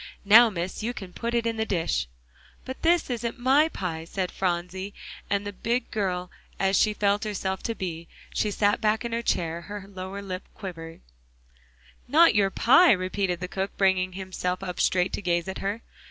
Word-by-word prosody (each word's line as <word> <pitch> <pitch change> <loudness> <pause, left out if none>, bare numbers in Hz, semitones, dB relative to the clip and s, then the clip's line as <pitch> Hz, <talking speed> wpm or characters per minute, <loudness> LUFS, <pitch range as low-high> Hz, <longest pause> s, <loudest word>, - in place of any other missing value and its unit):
"Now, 225 +3 +8
Miss, 180 -1 -4
you 240 +3 -3
can 185 -2 -8
put 235 0 -3
it 235 -1 +1
in 230 -1 -1
the 220 - +1
dish." 75 - 0 0.6
"But 260 - -6
is 340 +1 +3
isn't 240 0 -3
my 270 +6 +4
pie," 165 - -4
said 185 +1 -3
Phronsie, 185 +2 -3 0.3
and, 205 -1 -2
big 240 +2 -1
girl 180 -4 -2 0.3
as 195 0 +2
she 210 +1 +3
felt 205 0 +1
herself 190 -3 -3
to 230 - -3
be, 170 -4 -5 0.3
she 210 - 0
sat 205 0 +1
back 220 +1 +1
in 235 - -3
her 230 0 -1
chair, 170 -6 -1
her 205 +2 -8
lower 195 +1 -7
lip 185 -1 -5
quivering. 165 -5 -8 1.1
"Not 320 +4 +6
your 200 -1 +3
pie?" 270 - +6
repeated 185 -1 -1
the 180 - -3
cook, 190 +2 -4
bringing 185 -1 +2
himself 185 -1 -3
up 180 -2 -5
straight 180 0 +2
to - - -3
gaze 175 -1 0
at 190 - -5
her. 205 +4 -3
195 Hz, 185 wpm, -26 LUFS, 180-220 Hz, 1.1 s, Now